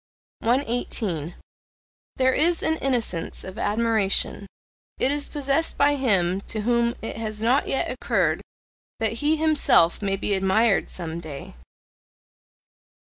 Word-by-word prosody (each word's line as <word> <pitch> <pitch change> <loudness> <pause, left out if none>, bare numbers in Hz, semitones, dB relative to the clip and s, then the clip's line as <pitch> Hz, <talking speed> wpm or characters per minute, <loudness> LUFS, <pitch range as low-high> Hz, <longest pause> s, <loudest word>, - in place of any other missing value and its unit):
118. 225 - -1 0.8
There 260 0 +2
is 335 +4 +2
an 320 0 +1
innocence 240 - -2
of 185 - -8
admiration: 210 -2 0 0.5
it 265 - +1
is 290 0 -2
possessed 290 +2 0
by 285 +1 +4
him 195 -8 +1
to 215 - -2
whom 235 +1 +1
it 225 - -5
has 215 -1 -4
not 245 +6 +2
yet 270 - -1
occurred - - 0 0.6
that 220 -1 +1
he 300 +2 +3
himself 285 - +3
may 195 -1 0
be 200 +1 -2
admired 195 +3 +2
some 165 -2 -5
day. 150 -4 -9
225 Hz, 125 wpm, -24 LUFS, 195-270 Hz, 0.8 s, by